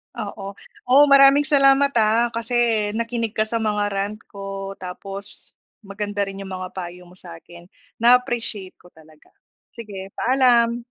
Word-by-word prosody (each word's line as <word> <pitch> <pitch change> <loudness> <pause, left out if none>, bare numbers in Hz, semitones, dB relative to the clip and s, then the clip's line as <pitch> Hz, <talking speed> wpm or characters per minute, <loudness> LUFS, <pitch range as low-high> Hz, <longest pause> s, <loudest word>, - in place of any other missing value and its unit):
Oo. 200 -3 -7 0.3
Oh, 275 +3 +6
maraming 275 +1 +7
salamat, 280 -1 +4
ah, 225 +2 +2
kasi 230 +1 -3 0.4
nakinig 230 -1 -3
ka 215 - +2
sa 225 +1 -2
mga 210 -1 -1
rant 200 +2 -3
ko. 195 -1 -7
Tapos, 195 +2 -6 0.3
maganda 205 0 -4
rin 195 0 -7
yung 195 -1 -8
mga 185 0 -7
payo 180 -1 -8
mo 180 +1 -13
sa 170 -2 -10
akin. 170 +1 -15 0.3
Na-appreciate 235 -5 +1
ko 175 - -19
talaga. 155 -1 -20 0.5
Sige, 205 -5 -8
paalam. 240 -2 +2
210 Hz, 145 wpm, -21 LUFS, 195-235 Hz, 0.5 s, maraming